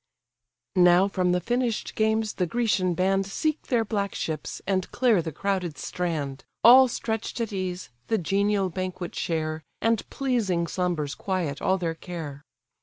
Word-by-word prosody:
Now 180 Hz, +1 st, +6 dB
from 185 Hz, -2 st, +1 dB
the 180 Hz, -, +2 dB
finish'd 240 Hz, +3 st, -1 dB
games 220 Hz, 0 st, +1 dB
the 180 Hz, -, -1 dB
Grecian 190 Hz, -4 st, +1 dB
band 195 Hz, +2 st, +1 dB
Seek 310 Hz, +10 st, -2 dB
their 235 Hz, -3 st, +2 dB
black 200 Hz, -2 st, -2 dB
ships, 155 Hz, -2 st, -4 dB
and 190 Hz, -2 st, 0 dB
clear 240 Hz, -7 st, +3 dB
the 160 Hz, 0 st, -4 dB
crowded 180 Hz, -2 st, -2 dB
strand, 145 Hz, -4 st, -3 dB, 0.2 s
All 260 Hz, +3 st, +9 dB
stretch'd 225 Hz, -1 st, -3 dB
at 225 Hz, -3 st, -2 dB
ease 185 Hz, -4 st, -4 dB, 0.2 s
the 225 Hz, -, +2 dB
genial 200 Hz, +1 st, +1 dB
banquet 185 Hz, -1 st, -4 dB
share, 155 Hz, -1 st, -2 dB, 0.2 s
And 225 Hz, -2 st, 0 dB
pleasing 220 Hz, -11 st, 0 dB
slumbers 170 Hz, -5 st, -1 dB
quiet 175 Hz, -7 st, -2 dB
all 190 Hz, -, +2 dB
their 170 Hz, -3 st, -2 dB
care. 160 Hz, -5 st, -7 dB
185 Hz, 150 wpm, -26 LUFS, 170-220 Hz, 0.2 s, All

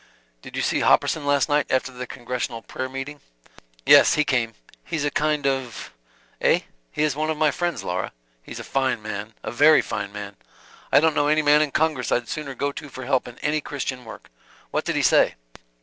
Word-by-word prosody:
"Did -, -, -11 dB
you -, -, -1 dB
see -, -, +1 dB
Hopperson 150 Hz, -3 st, +2 dB
last 145 Hz, -1 st, +3 dB
night 145 Hz, -1 st, +1 dB
after 130 Hz, 0 st, +1 dB
the 125 Hz, 0 st, -7 dB
congressional 120 Hz, -2 st, -4 dB
prayer 130 Hz, 0 st, -5 dB
meeting?" 135 Hz, +2 st, -6 dB, 0.6 s
"Yes. -, -, +7 dB
He 150 Hz, -, +3 dB
came. 120 Hz, -6 st, 0 dB, 0.3 s
He's 155 Hz, -4 st, -3 dB
a 145 Hz, -, 0 dB
kind 150 Hz, -1 st, 0 dB
of 135 Hz, -3 st, -2 dB, 0.2 s
" -, -, -34 dB
"Eh? -, -, +3 dB, 0.3 s
he -, -, -1 dB
is 150 Hz, -3 st, +1 dB
one 155 Hz, +1 st, -1 dB
of 160 Hz, -, -1 dB
my 155 Hz, -1 st, +3 dB
friends, 175 Hz, -1 st, -2 dB
Laura. 90 Hz, +1 st, -3 dB, 0.3 s
He's -, -, -9 dB
a -, -, -6 dB
fine 130 Hz, -5 st, -1 dB
man, 105 Hz, 0 st, -6 dB
a -, -, -4 dB
very 150 Hz, +6 st, +6 dB
fine 100 Hz, -1 st, -4 dB
man. 100 Hz, -1 st, -8 dB, 0.5 s
I 140 Hz, -, +6 dB
don't 160 Hz, 0 st, +3 dB
know 145 Hz, -, +1 dB
any 155 Hz, +1 st, +3 dB
man 150 Hz, +1 st, +5 dB
in 155 Hz, -, +1 dB
congress 150 Hz, -4 st, 0 dB
I'd 120 Hz, -1 st, +1 dB
sooner 145 Hz, -4 st, -5 dB
go 140 Hz, +2 st, -1 dB
to 145 Hz, +1 st, -9 dB
for 130 Hz, -1 st, -8 dB
help 130 Hz, -1 st, +1 dB
in 120 Hz, -, -11 dB
any 150 Hz, +1 st, +1 dB
Christian 135 Hz, -3 st, -4 dB
work. 110 Hz, -, -12 dB, 0.4 s
What -, -, -1 dB
did -, -, -1 dB
he -, -, +1 dB
say?" -, -, +4 dB
135 Hz, 210 wpm, -23 LUFS, 120-150 Hz, 0.6 s, Yes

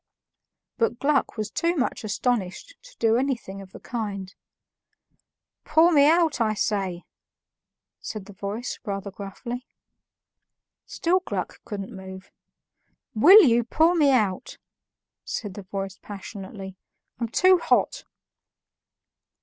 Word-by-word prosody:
But 230 Hz, 0 st, +1 dB
Gluck 280 Hz, -3 st, +1 dB
was 215 Hz, 0 st, -3 dB
too 340 Hz, +1 st, 0 dB
much 265 Hz, -6 st, -1 dB
astonished 220 Hz, -, -2 dB
to -, -, -17 dB
do 225 Hz, 0 st, +3 dB
anything 240 Hz, -7 st, -2 dB
of 190 Hz, -1 st, -13 dB
the -, -, -11 dB
kind. 200 Hz, -5 st, -5 dB, 1.3 s
"Pour 325 Hz, +3 st, +4 dB
me 290 Hz, -2 st, +6 dB
out, 325 Hz, -6 st, +3 dB
I 215 Hz, -1 st, +1 dB
say," 195 Hz, -4 st, -1 dB, 1.0 s
said 215 Hz, -3 st, -7 dB
the 205 Hz, -, -12 dB
voice 205 Hz, +5 st, -5 dB
rather 200 Hz, -2 st, -4 dB
gruffly. 225 Hz, +6 st, -7 dB, 1.2 s
Still 360 Hz, +3 st, +1 dB
Gluck 365 Hz, -, -5 dB
couldn't 205 Hz, +1 st, -6 dB
move. 190 Hz, 0 st, -10 dB, 0.8 s
"WILL 370 Hz, -, +9 dB
you 240 Hz, -4 st, +4 dB
pour 320 Hz, +8 st, +3 dB
me 305 Hz, -5 st, +4 dB
out?" 210 Hz, -8 st, 0 dB, 0.7 s
said 205 Hz, -4 st, -5 dB
the 205 Hz, -, -8 dB
voice 195 Hz, 0 st, -6 dB
passionately. 195 Hz, -1 st, -9 dB, 0.4 s
"I'm 235 Hz, -, -1 dB
too 370 Hz, +8 st, +5 dB
hot." -, -, +1 dB
220 Hz, 115 wpm, -25 LUFS, 195-280 Hz, 1.3 s, WILL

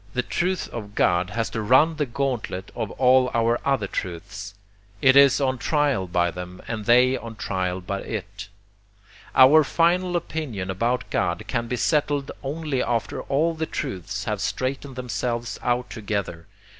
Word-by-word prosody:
The 125 Hz, -, +1 dB
truth 180 Hz, +8 st, -1 dB
of 105 Hz, -3 st, -8 dB
'God' 90 Hz, +1 st, +2 dB
has 115 Hz, +2 st, -2 dB
to 110 Hz, -, -3 dB
run 130 Hz, +9 st, +4 dB
the 150 Hz, -3 st, 0 dB
gauntlet 120 Hz, -7 st, -3 dB
of 110 Hz, -3 st, -3 dB
all 130 Hz, 0 st, +4 dB
our 115 Hz, +1 st, +2 dB
other 135 Hz, -7 st, +1 dB
truths. 100 Hz, +3 st, -6 dB, 0.4 s
It 130 Hz, +3 st, +5 dB
is 140 Hz, -1 st, +7 dB
on 130 Hz, -2 st, 0 dB
trial 145 Hz, -, +1 dB
by 85 Hz, 0 st, +1 dB
them 90 Hz, +1 st, -8 dB
and 110 Hz, -2 st, -4 dB
they 125 Hz, +2 st, +5 dB
on 115 Hz, -3 st, -7 dB
trial 95 Hz, -3 st, -2 dB
by 100 Hz, +2 st, -4 dB
it. 105 Hz, 0 st, -6 dB, 0.9 s
Our 145 Hz, +4 st, +8 dB
FINAL 175 Hz, +4 st, +2 dB
opinion 140 Hz, -, -3 dB
about 120 Hz, +6 st, -1 dB
God -, -, 0 dB
can 115 Hz, 0 st, -2 dB
be 125 Hz, -, -2 dB
settled 145 Hz, +1 st, 0 dB
only 145 Hz, -1 st, -2 dB
after 115 Hz, -3 st, -1 dB
all 155 Hz, +5 st, +1 dB
the 160 Hz, 0 st, -3 dB
truths 95 Hz, +2 st, -4 dB
have 105 Hz, -2 st, -2 dB
straightened 130 Hz, +4 st, -3 dB
themselves 120 Hz, -1 st, -3 dB
out 125 Hz, 0 st, -1 dB
together. 100 Hz, -7 st, -4 dB
120 Hz, 155 wpm, -24 LUFS, 100-140 Hz, 0.9 s, Our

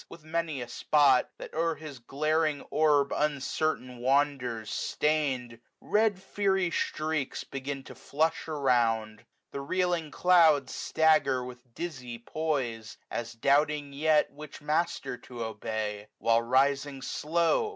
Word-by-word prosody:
With 165 Hz, -, -12 dB
many 160 Hz, -4 st, -2 dB
a -, -, -9 dB
spot, 135 Hz, +1 st, +3 dB
that -, -, -9 dB
o'er 165 Hz, +1 st, 0 dB
his 150 Hz, -5 st, -9 dB
glaring 155 Hz, +3 st, 0 dB
orb 150 Hz, -2 st, +3 dB
Uncertain 145 Hz, -3 st, -1 dB
wanders, 125 Hz, -4 st, 0 dB
stain'd; 135 Hz, -6 st, -1 dB, 0.2 s
red 210 Hz, -2 st, +1 dB
fiery 190 Hz, -2 st, 0 dB
streaks 155 Hz, -4 st, -2 dB
120 -, -, -24 dB
Begin 135 Hz, 0 st, -4 dB
to -, -, -11 dB
flush 160 Hz, +4 st, -1 dB
around. 120 Hz, -7 st, +1 dB, 0.3 s
The 140 Hz, -, -4 dB
reeling 175 Hz, +1 st, 0 dB
clouds 160 Hz, -6 st, +4 dB
Stagger 155 Hz, -5 st, +2 dB
with 125 Hz, -1 st, -12 dB
dizzy 125 Hz, -9 st, -5 dB
poise, 120 Hz, -4 st, -3 dB
as 120 Hz, 0 st, -4 dB
doubting 145 Hz, +4 st, +1 dB
yet 155 Hz, +1 st, +2 dB
Which 150 Hz, 0 st, -10 dB
master 150 Hz, -4 st, -1 dB
to 120 Hz, -2 st, -7 dB
obey: 110 Hz, -1 st, -4 dB
while 115 Hz, 0 st, +3 dB
rising 135 Hz, +2 st, +1 dB
slow. 170 Hz, -, +1 dB
140 Hz, 125 wpm, -29 LUFS, 125-155 Hz, 0.3 s, clouds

